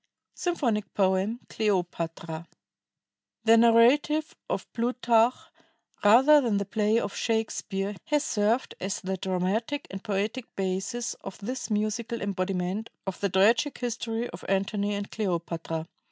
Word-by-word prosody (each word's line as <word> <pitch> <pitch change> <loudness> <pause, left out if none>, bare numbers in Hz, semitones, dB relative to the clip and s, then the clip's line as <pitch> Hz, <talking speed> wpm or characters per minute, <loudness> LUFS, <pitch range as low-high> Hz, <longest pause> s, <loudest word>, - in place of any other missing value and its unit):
SYMPHONIC 245 - -1
POEM, 195 +4 +1
"CLEOPATRA" 170 -5 -2 1.0
The 225 0 +6
narrative 245 +7 +4
of - - -2
Plutarch, 240 0 +3 0.7
rather 265 +8 +7
than 230 -6 +1
the 200 - -1
play 215 +2 +2
of 205 -3 -4
Shakespeare, 210 -3 -1
has 295 -1 +1
served 230 -4 +1
as 190 +1 -2
the 190 0 -3
dramatic 190 +10 -1
and 195 0 -7
poetic 215 +5 -2
basis 195 +5 -2
of 195 - -7
this 245 +5 -5
musical 215 +2 -1
embodiment 190 +1 -2 0.2
of 190 -2 -4
the 200 - 0
tragic 220 +9 +3
history 235 -1 -2
of 170 - -10
Antony 200 +1 0
and 200 0 -5
Cleopatra. 170 -5 -3
210 Hz, 125 wpm, -27 LUFS, 190-235 Hz, 1.0 s, rather